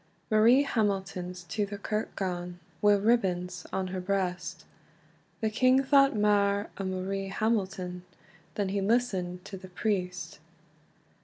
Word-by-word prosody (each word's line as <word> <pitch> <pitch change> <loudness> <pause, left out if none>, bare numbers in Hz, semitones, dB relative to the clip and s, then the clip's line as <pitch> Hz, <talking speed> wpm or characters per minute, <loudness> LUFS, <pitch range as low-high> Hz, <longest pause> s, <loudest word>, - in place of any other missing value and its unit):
Marie 230 +6 +6
Hamilton's 190 -6 -2
to 170 +5 -2
the 205 0 -6
kirk 215 +2 -3
gane, 180 -2 -3 0.2
Wi 205 0 +6
ribbons 185 -5 0
on 190 -1 -2
her 185 0 -3
breast; 185 -1 -2 0.8
The 220 -1 +1
king 255 +4 +4
thought 275 -1 +5
mair 205 -1 +2
o 195 - -2
Marie 190 +1 -2
Hamilton, 190 -4 -1 0.5
Than 200 -2 -1
he 200 +1 -1
listend 195 -5 0
to 195 - -7
the 185 0 -11
priest. 180 -5 -2
195 Hz, 130 wpm, -29 LUFS, 180-215 Hz, 0.8 s, Marie